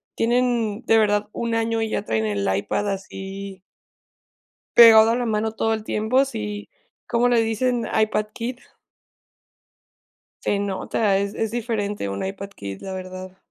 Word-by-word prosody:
tienen, 235 -2 +1
de 225 - +4
verdad, 210 -1 +2
1 235 -1 -2
año 225 0 0
y 220 - -1
ya - - -2
traen 110 0 -1
el 100 -2 -1
iPad 105 - -1
así 195 0 -7 1.2
pegado 225 -1 +9
a - - +2
la 245 - -1
mano 220 0 0
todo 225 0 0
el 220 -1 -3
tiempo, 220 +6 +1
sí. 105 - -5 0.4
¿Cómo 240 +1 +2
le 235 -2 +4
dicen? 235 +2 0
IPad 215 -1 +1
kid. 245 +2 -5 1.8
Se 205 - 0
nota, 200 +1 0
es 200 +1 -2
es 225 -1 -2
diferente 215 - -2
un 100 0 -4
iPad 195 +1 -6
kid, 100 - -8
la 190 -1 -6
verdad. 185 0 -8
210 Hz, 150 wpm, -23 LUFS, 195-230 Hz, 1.8 s, pegado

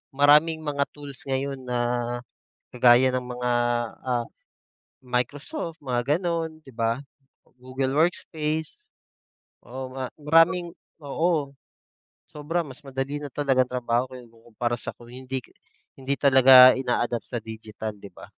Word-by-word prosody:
maraming 150 +3 +5
mga 140 -1 0
tools 145 -2 -10
ngayon 135 0 -2
na 125 -1 -2 1.0
kagaya 125 +1 +6
ng 130 - 0
mga, 125 0 -2 0.5
ah, 120 -2 -1 0.8
Microsoft 145 - -3
mga 125 +4 +1
gano'n, 165 -3 -3
di 135 - -13
ba, 115 +1 0 0.6
Google 130 +1 -2
workspace. 160 - -1 0.8
Oo, 130 +1 -7
ma 130 -2 -4
maraming 165 +3 +3 0.3
oo 150 -1 0 0.8
sobra 160 +4 -2
mas 130 0 -11
madali 135 +2 -3
na 145 - -5
talagang 135 -3 +2
trabaho 125 0 0
kung 125 -1 -10
ikukumpara 115 +1 -4
sa - - -6
kung 120 0 -15
hindi 130 0 -5 0.6
hindi 135 +1 -1
talaga 130 -2 +8
ina-adapt 120 -2 -1
sa 120 - -3
digital 110 -1 -7
di 100 - -10
ba? - - -15
130 Hz, 125 wpm, -25 LUFS, 125-150 Hz, 1.0 s, talaga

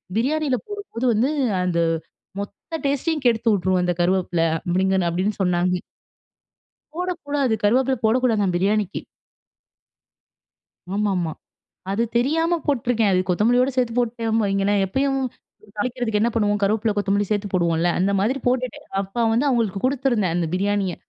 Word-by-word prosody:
பிரியாணியில 275 +3 +1
போடும்போது 405 - -5
வந்து, 230 +6 +2 0.3
அந்த 180 -2 0 0.6
மொத்த 205 +11 -6
டேஸ்ட்டையும் 290 +2 -1
கெடுத்து 230 -1 +2
வுட்ரும் 185 -2 +1
அந்த 180 0 +1
கருவேப்பிலை." 175 -2 +1 0.2
அப்டிங்கன்னு 190 0 +2
அப்டின்னு 190 +5 -1
சொன்னாங்க. 180 0 +1 1.2
போடக்கூடாது. 290 -8 -1
கருவேப்பிலை 255 +4 +3
போடக்கூடாதாம் 220 -5 +2
பிரியாணிக்கு. 200 +1 0 1.9
ஆமாமா. 190 -6 0 0.6
அது 200 +4 0
தெரியாம 325 +7 +2
போட்டுருக்கேன். 235 -6 +1
அது 185 - +3
கொத்தமல்லியோட 245 +8 +3
சேர்த்து 245 -3 +1
போட்டுட்டேன் 230 -2 0
வைங்களேன், 195 0 +1
எப்பயும் 270 +6 0 0.6
தாளிக்கிறதுக்கு 230 -1 -1
என்ன 235 - +2
பண்ணுவோம், 205 -2 +1
கருவேப்பில, 215 +1 +1
கொத்தமல்லி 205 0 +1
சேர்த்து 205 -1 0
போடுவோம்ல. 170 -2 +1
அந்த 190 +2 +2
மாதிரி 240 +7 +1
போட்டுட்டேன். 250 -1 -1 0.2
அப்ப 225 +4 -1
வந்து 240 +6 +2
அவுங்களுக்கு 225 -6 0
கொடுத்துருந்தேன். 245 -9 0
அந்த 170 -2 0
பிரியாணிய. 195 -1 0
215 Hz, 120 wpm, -22 LUFS, 190-255 Hz, 1.9 s, கருவேப்பிலை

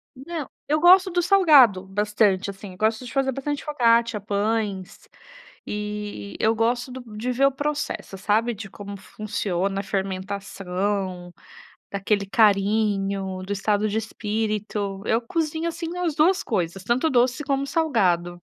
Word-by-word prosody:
Não, 295 +3 -6 0.2
eu 305 +1 +2
gosto 370 +3 +6
do 350 0 +1
salgado 295 - +5
bastante, 205 0 +1
assim. 195 0 -10
Eu - - -13
gosto 220 +4 0
de - - -8
fazer 270 -1 +1
bastante 280 +2 -4
focaccia, 235 -6 +2
pães, 205 -2 -2 0.6
e 210 - -5
e - - -7
eu 220 +1 +3
gosto 240 +3 0
do 245 -4 -9
de 235 +4 -2
ver 270 +3 +3
o 275 - +2
processo, 290 -7 -3
sabe, 220 +4 +1
de 205 -1 -8
como 200 -1 -8
funciona 195 -1 -3
a - - -3
fermentação, 195 -1 -3 0.6
daquele 200 +1 0
carinho, 195 -2 +1
do 200 +2 -3
estado 205 +1 0
de 210 - -1
espírito. 210 -2 -3
Eu 225 +2 +2
cozinho, 320 +5 -2
assim, 335 +1 -5
as 340 -4 -1
2 360 +5 +3
coisas. 185 -4 -2
Tanto 245 +9 +1
doce 250 +3 +2
como 275 -1 0
salgado. 180 - +1
215 Hz, 145 wpm, -24 LUFS, 195-265 Hz, 0.6 s, gosto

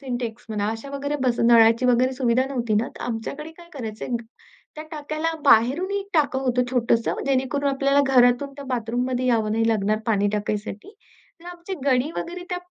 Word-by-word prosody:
Syntax 245 -3 -5
म्हणा 210 -1 -2
अशा 225 +5 -7
वगैरे 285 +1 -3
बस 245 -2 +1
नळाची 230 +1 +5
वगैरे 250 +1 +3
सुविधा 255 -1 +1
नव्हती 240 -5 -1
ना. 220 +3 +1
तर - - -7
आमच्याकडे 245 +7 -5
काय 345 -1 -15
करायचे 225 -6 -6
ग 240 -2 -2 0.5
त्या 310 - -7
टाक्याला 310 +1 -3
बाहेरूनही 290 - +3
टाकं 290 -4 +2
होतं 250 -2 +1
छोटसं 235 -2 +1
जेणेकरून 275 +1 0
आपल्याला 275 +1 +2
घरातून 255 +1 +3
त्या 280 - -8
बाथरूममध्ये 250 0 -2
यावं 220 -3 +1
नाही 225 +1 +1
लागणार 215 -1 +1
पाणी 205 -3 +2
टाकायसाठी. 210 - -4 0.5
तर - - -17
आमची 350 +2 -7
गडी 260 +2 +2
वगैरे 355 +1 -5
त्या 360 - -1
बा 355 - -19
250 Hz, 175 wpm, -23 LUFS, 230-280 Hz, 0.5 s, नळाची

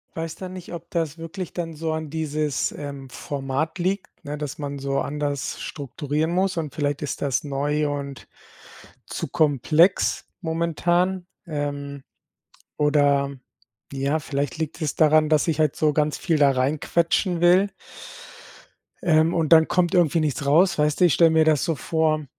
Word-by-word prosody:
Weiß 165 0 -4
da 185 - -7
nicht, 185 -1 -9
ob 170 0 -9
das 165 -2 -2
wirklich 165 +2 -7
dann 165 -2 -4
so 160 +1 -3
an 155 -2 -4
dieses, 155 -2 -1
ähm, 140 -2 -8
Format 140 +6 -3
liegt, 185 +2 -3
ne? 150 0 -5
Dass 150 -1 -6
man 140 -1 -4
so 135 0 -1
anders 145 -1 -3
strukturieren 145 +3 -3
muss 185 0 0
und 155 -4 -4
vielleicht 145 -1 -1
ist 150 - -4
das 140 -1 0
neu 145 +1 -1
und 140 -2 -6 0.8
zu - - -4
komplex 155 +3 +2
momentan. 175 +2 0 0.2
Ähm, 145 -2 -4 0.7
oder, 145 -2 +2 0.6
ja, 140 +3 0
vielleicht 140 -2 -3
liegt 160 +1 -4
es 150 -3 -1
daran, 155 0 +4
dass 155 +1 +2
ich 160 -2 0
halt 155 -3 +2
so 155 -1 +2
ganz 150 0 +1
viel 165 -4 0
da 140 -2 +5
rein 135 +4 0
quetschen 170 +1 +1
will 180 +3 +5 1.4
ähm, 160 -1 +3
und 165 -2 0
dann 160 -1 +6
kommt 180 0 +1
irgendwie 170 -2 +3
nichts 145 -2 -1
raus, 165 +5 +4
weißt 150 +2 +1
du? - - +8
Ich 170 - +4
stelle 165 -1 +5
mir 160 0 +4
das 155 -3 +3
so 165 - 0
vor, 155 0 0
155 Hz, 165 wpm, -23 LUFS, 145-165 Hz, 1.4 s, du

